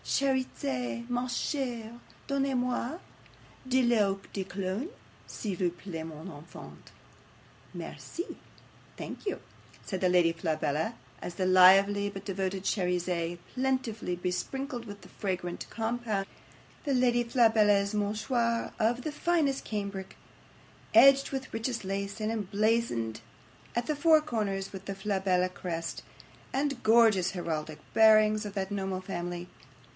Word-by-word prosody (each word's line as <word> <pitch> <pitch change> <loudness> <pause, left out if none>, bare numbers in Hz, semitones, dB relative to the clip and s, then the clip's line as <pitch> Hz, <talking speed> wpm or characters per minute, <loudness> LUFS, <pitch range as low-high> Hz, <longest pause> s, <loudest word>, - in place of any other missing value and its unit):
"CHERIZETTE, 235 - -1
MA 245 +1 0
CHERE, 240 -3 -3 0.3
DONNEZ 275 -1 0
MOI 250 +4 -1 0.7
DE 260 0 +3
L'EAU 210 -5 +3
DE 195 - -2
COLOGNE, 195 - -3 0.4
S'IL 205 -4 -4
VOUS 180 -2 +1
PLAIT, 170 -5 -6
MON 160 +2 -9
ENFANT." 160 -1 -11 0.8
'"MERCIE 350 - -6 0.6
thank - - -7
you," - - -1 0.5
said 190 -3 -3
the 185 - +3
Lady 175 -2 +4
Flabella, 160 +3 -1 0.3
as 175 - -6
the 185 - 0
lively 195 +2 +6
but 195 0 -8
devoted 190 -1 -2
Cherizette 180 -3 0 0.2
plentifully 250 -8 -1
besprinkled 235 +9 -3
with 205 -2 -9
the - - -13
fragrant 180 -3 -4
compound 225 -3 -2 0.6
the 285 - 0
Lady 245 -1 +3
Flabella's 220 -4 +4
MOUCHOIR 230 +3 0
of 235 +2 +2
finest 305 -5 +1
cambric, 200 -3 -4 0.8
edged 275 0 +8
with 270 -1 -4
richest 225 -1 -2
lace, 200 +2 -3
and 215 +1 -1
emblazoned 210 - 0 0.5
at 240 0 0
the 305 - 0
four 315 +2 +6
corners 210 -10 -2
with 190 0 -8
the 195 - -4
Flabella 190 -2 +1
crest, 170 -2 -4 0.5
and 275 -2 -1
gorgeous 220 -5 +5
heraldic 160 -4 -3
bearings 215 -1 +6
of 200 - -9
that 190 0 -2
noble 190 -2 -2
family. 175 -1 -5
205 Hz, 125 wpm, -30 LUFS, 185-240 Hz, 0.8 s, edged